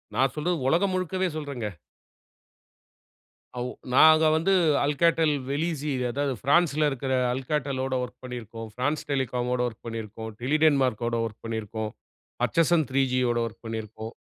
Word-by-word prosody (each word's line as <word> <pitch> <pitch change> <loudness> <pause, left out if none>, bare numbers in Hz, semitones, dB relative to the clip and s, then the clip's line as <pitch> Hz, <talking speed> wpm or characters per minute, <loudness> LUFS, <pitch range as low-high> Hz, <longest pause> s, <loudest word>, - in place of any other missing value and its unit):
நான் 135 0 +2
சொல்றது 170 +4 0
உலகம் 180 +7 +3
முழுக்கவே 185 +1 0
சொல்றேங்க. 140 -7 -4 1.9
அவ் 125 +1 -2 0.2
நாங்க 155 +3 +7
வந்து 170 +5 +2 0.3
Alcatel 160 +2 +3 0.2
velizy, 150 0 -1 0.2
அதாவது 140 +1 -1
பிரான்ஸ்ல 155 0 +3
இருக்கிற 135 -1 -2 0.2
Alcatel 135 +1 -2
லோட 130 0 -2
வொர்க் 125 0 -7
பண்ணிருக்கோம். 115 -2 -7
பிரான்ஸ் 145 +5 -1
Telecom 125 -3 0
மோட 125 - 0
வொர்க் 110 - -9
பண்ணிருக்கோம். 110 -1 -6
Tele 145 +5 +1
denmark 135 -6 +3
கோட 120 0 0
வொர்க் 115 0 -8
பண்ணிருக்கோம். 110 -1 -4 0.5
பர்ச்சசன் 165 -1 +3
த்ரீ 135 +1 +2
ஜி 130 - +1
யோட 120 -1 +1
வொர்க் 115 +1 -9
பண்ணிருக்கோம். 110 0 -6
135 Hz, 140 wpm, -26 LUFS, 115-155 Hz, 1.9 s, நாங்க